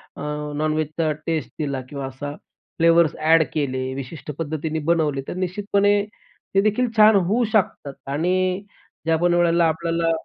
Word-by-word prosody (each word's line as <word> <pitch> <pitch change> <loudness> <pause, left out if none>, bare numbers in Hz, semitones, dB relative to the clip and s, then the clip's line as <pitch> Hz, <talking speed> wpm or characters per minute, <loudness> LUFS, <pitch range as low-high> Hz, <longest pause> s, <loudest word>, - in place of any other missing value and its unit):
अ, - - -9 0.3
नॉन-व्हेजचा 155 +1 0
taste 160 -2 -2
दिला, 140 -3 -2
किंवा 140 -2 -5
असा 145 +2 -6 0.4
फ्लेवर्स 165 -1 +4
ॲड 160 +1 +5
केले, 130 -3 -2
विशिष्ट 140 +3 -7
पद्धतीने 155 0 -2
बनवले, 155 -5 +1
तर - - -4
निश्चितपणे 200 +2 +1 0.5
ते 195 - +6
देखील 215 +4 +1
छान 215 0 +7
होऊ 200 +6 +2
शकतात. 180 -9 0
आणि 185 +6 0 0.4
ज्या 165 0 +3
पण 175 +1 +2
वेळेला 170 -1 +3
आपल्याला 165 +1 0
165 Hz, 140 wpm, -22 LUFS, 150-185 Hz, 0.5 s, छान